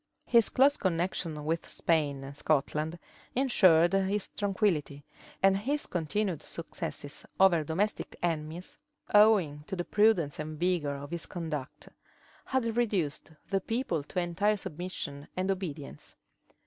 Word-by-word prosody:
His 235 -2 +5
close 280 +3 +4
connections 170 -3 -1
with 160 +3 -2
Spain 145 -5 0
and 140 +1 -8
Scotland 155 +2 0 0.4
insured 185 -10 +5
his 195 +1 +1
tranquillity; 190 -8 -1 0.4
and 195 0 +6
his 275 +9 -1
continued 175 0 -1
successes 150 -3 -6 0.2
over 180 -4 +5
domestic 185 +8 -2
enemies, 165 +1 -3 0.3
owing 200 -9 +5
to - - -3
the 175 -1 -3
prudence 205 -9 +3
and 155 0 -5
vigor 170 -5 +1
of 140 +2 -8
his 170 -1 -3
conduct, 155 -6 -5 0.6
had 230 -4 0
reduced 195 -11 0 0.2
the 195 -1 +2
people 225 - -1
to 180 - -3
entire 185 +5 +1
submission 175 -6 -5
and 185 +1 +1
obedience. 155 - -6
175 Hz, 125 wpm, -30 LUFS, 155-200 Hz, 0.6 s, and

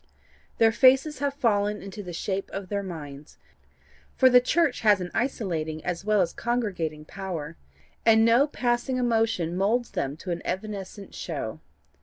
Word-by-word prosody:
Their 225 -1 +5
faces 265 +4 +4
have 280 0 -1
fallen 210 -5 +1
into 195 +1 -7
the 180 -3 -8
shape 190 +3 -3
of 195 -2 -6
their 200 -1 -1
minds, 150 -6 -9 0.8
for 260 -1 +5
the 250 0 +7
church 290 +1 +1
has 210 -3 +5
an 180 -1 -5
isolating 165 - -2
as 175 0 -3
well 210 -1 +3
as 170 -2 0
congregating 185 -11 -2
power, 165 -4 -6 0.5
and 225 0 +5
no 240 +5 +5
passing 245 -2 -1
emotion 225 -8 +1
moulds 225 +6 +1
them 140 +2 -3
to 180 +2 -6
an 170 - -3
evanescent 195 +1 -5
show. - - -5
205 Hz, 155 wpm, -26 LUFS, 175-240 Hz, 0.8 s, the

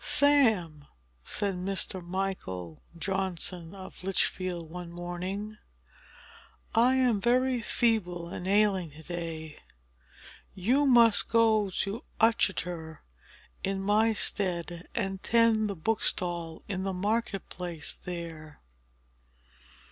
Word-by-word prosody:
"Sam," 220 - +4 0.4
said 200 - 0
Mr. 185 0 0
Michael 175 - -4 0.2
Johnson 180 -1 -1
of 190 -1 -11
Lichfield, 185 -2 0
one 175 -1 -7
morning, 185 +5 -5 1.1
"I 245 +3 +4
am 245 -6 +2
very 250 +1 +2
feeble 195 -9 0
and 180 +1 -6
ailing 195 -3 +2
to 150 +2 -14
day. 165 -2 -6 1.0
You 255 +10 +2
must 235 -4 +6
go 220 -3 +3
to 200 +3 -4 0.2
Uttoxeter 180 -8 0 0.6
in 195 0 -2
my 215 +3 +3
stead, 175 -4 0
and 195 -3 -2
tend 230 -2 +3
the 200 - -3
bookstall 175 -3 -1
in 190 -2 -3
the 190 0 -2
market 205 +1 -2
place 170 -4 -3
there." 165 -4 -8
190 Hz, 100 wpm, -28 LUFS, 175-215 Hz, 1.1 s, must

